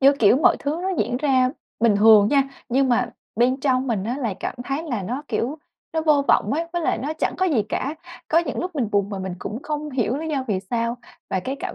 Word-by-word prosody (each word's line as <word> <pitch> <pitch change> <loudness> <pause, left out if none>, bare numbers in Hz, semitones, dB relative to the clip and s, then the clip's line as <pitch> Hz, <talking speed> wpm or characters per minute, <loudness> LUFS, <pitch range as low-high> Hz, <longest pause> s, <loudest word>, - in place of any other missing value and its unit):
như 275 +1 +7
kiểu, 235 -3 +4
mọi 295 - +4
thứ 295 +4 -2
nó 380 - -1
diễn 240 +4 0
ra 260 -2 +2 0.3
bình 225 -3 +4
thường 210 -1 +7
nha. 280 +1 +4 0.3
Nhưng 265 +2 +2
mà 245 -1 +2 0.3
bên 255 +3 +2
trong 265 -1 +1
mình 215 -6 -1
á, 240 +5 -2
là 225 -8 -2
cảm - - -3
thấy 275 +4 -2
là 245 -11 -3
nó, 250 +9 -4
kiểu, 250 +7 -2 0.3
nó 320 - 0
vô 300 -3 +3
vọng - - +3
ấy, 320 +4 0
với 345 -1 -1
lại - - +1
nó 290 +4 -3
chẳng 315 - -2
có 375 - +2
gì 280 - +2
cả. 280 +7 -2 0.3
Có 325 - +4
những 340 - -2
lúc 365 0 -4
mình 255 -8 0
buồn 200 0 +1
mà 200 - -4
mình 190 -1 -4
cũng 225 +8 -6
không 300 0 -4
hiểu 255 -2 0
lý 320 +2 -4
do 275 -4 -1
vì 190 -3 0
sao. 235 0 0 0.3
Và 190 - 0
cái 265 +8 -4
cảm - - -4
260 Hz, 255 wpm, -23 LUFS, 225-295 Hz, 0.3 s, như